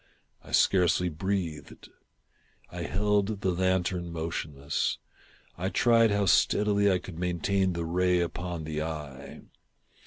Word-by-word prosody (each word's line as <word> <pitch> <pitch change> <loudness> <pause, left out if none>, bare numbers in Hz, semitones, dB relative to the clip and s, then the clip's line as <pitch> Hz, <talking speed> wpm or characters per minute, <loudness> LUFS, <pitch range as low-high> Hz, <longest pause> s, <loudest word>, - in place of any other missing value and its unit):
I - - -13
scarcely 90 -1 +3
breathed. 85 -2 -4 0.8
I - - -6
held 105 +2 0
the 95 - +1
lantern 90 -1 0
motionless. 80 -4 -2 0.6
I 95 +2 -1
tried 115 +1 +4
how 100 -1 +1
steadily 100 +2 +3
I 95 - +3
could 90 -2 -9
maintain 90 +2 0
the 85 -1 -3
ray 90 +2 +2
upon 85 -1 -3
the 75 0 -3
eye. 75 -4 -7
90 Hz, 120 wpm, -28 LUFS, 80-100 Hz, 0.8 s, tried